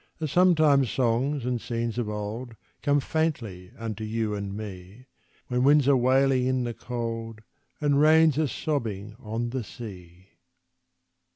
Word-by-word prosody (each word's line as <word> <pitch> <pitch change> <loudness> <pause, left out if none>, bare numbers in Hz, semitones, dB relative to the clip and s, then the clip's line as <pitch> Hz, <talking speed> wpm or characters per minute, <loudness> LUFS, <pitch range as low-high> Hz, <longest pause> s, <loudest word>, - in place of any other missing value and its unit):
As 155 -3 -3
sometimes 155 -8 +4
songs 130 +3 0
and 125 -2 -1
scenes 115 0 -3
of 115 -3 -2
old 105 +3 -5 0.3
Come 145 0 +3
faintly 125 - -2
unto 110 -2 -5
you 110 0 -2
and 100 -1 -4
me, 100 +2 -9 0.4
When 125 0 0
winds 145 0 +5
are 140 - +6
wailing 130 0 +3
in 130 -1 +1
the 120 -1 -3
cold, 115 -2 -5 0.4
And 145 -1 +2
rains 155 -1 +5
are 155 - +2
sobbing 110 -9 -3
on 115 +2 -3
the 130 -1 -2
sea. 95 -5 -11
120 Hz, 145 wpm, -26 LUFS, 110-140 Hz, 0.4 s, are